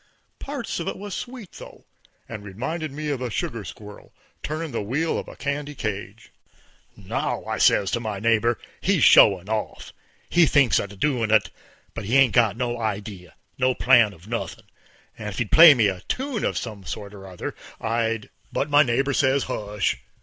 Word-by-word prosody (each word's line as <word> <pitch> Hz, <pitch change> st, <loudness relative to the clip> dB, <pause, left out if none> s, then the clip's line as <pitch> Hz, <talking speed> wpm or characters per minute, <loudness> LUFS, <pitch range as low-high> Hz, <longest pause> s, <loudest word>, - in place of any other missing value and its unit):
Parts 275 Hz, -9 st, -5 dB
of 170 Hz, -, -4 dB
it -, -, -3 dB
was 200 Hz, 0 st, -7 dB
sweet, 245 Hz, -4 st, -7 dB
though, -, -, -13 dB, 0.4 s
and 110 Hz, -3 st, -8 dB
reminded 135 Hz, -, -4 dB
me 150 Hz, +2 st, -5 dB
of 140 Hz, -3 st, -2 dB
a 125 Hz, -, -2 dB
sugar 115 Hz, 0 st, -3 dB
squirrel 105 Hz, +1 st, -11 dB, 0.3 s
turnin' 155 Hz, +1 st, -4 dB
the 115 Hz, -, -2 dB
wheel 140 Hz, +11 st, -1 dB
of -, -, -8 dB
a -, -, -10 dB
candy 145 Hz, +1 st, -4 dB
cage. 105 Hz, -1 st, -6 dB, 0.7 s
"Now," -, -, -3 dB
I -, -, -3 dB
says 100 Hz, -1 st, +4 dB
to 120 Hz, -, 0 dB
my 110 Hz, -4 st, -4 dB
neighbor, 115 Hz, +2 st, +2 dB, 0.2 s
"he's 190 Hz, -6 st, +2 dB
showin' 95 Hz, -2 st, +6 dB
off. 110 Hz, 0 st, -4 dB, 0.3 s
He 175 Hz, -2 st, +4 dB
thinks 140 Hz, -3 st, +4 dB
he's -, -, 0 dB
a 100 Hz, 0 st, -12 dB
doin' 120 Hz, 0 st, 0 dB
of 110 Hz, -1 st, +5 dB
it, 95 Hz, -, -12 dB, 0.4 s
but 115 Hz, -, -6 dB
he 120 Hz, +6 st, +2 dB
ain't 135 Hz, -4 st, +5 dB
got 115 Hz, -4 st, +3 dB
no 120 Hz, -1 st, -2 dB
idee, 100 Hz, -4 st, -4 dB, 0.3 s
no 130 Hz, 0 st, +2 dB
plan 120 Hz, -5 st, +5 dB
of 85 Hz, 0 st, -16 dB
nothin'. 115 Hz, +1 st, -5 dB, 0.5 s
If 105 Hz, -3 st, -6 dB
he'd 120 Hz, -4 st, -2 dB
play 160 Hz, -2 st, +9 dB
me 115 Hz, -4 st, +3 dB
a 95 Hz, -2 st, -3 dB
tune 265 Hz, -4 st, -2 dB
of -, -, -1 dB
some 105 Hz, -4 st, -6 dB
kind 100 Hz, +4 st, -7 dB
or 95 Hz, -1 st, -11 dB
other, 90 Hz, -2 st, -6 dB, 0.3 s
I'd 115 Hz, -1 st, -2 dB
" -, -, -37 dB
But 145 Hz, -, -2 dB
my 145 Hz, 0 st, +7 dB
neighbor 135 Hz, +1 st, +1 dB
says, 135 Hz, +1 st, +2 dB
"Heish!" 105 Hz, -5 st, -2 dB
115 Hz, 190 wpm, -24 LUFS, 105-145 Hz, 0.7 s, play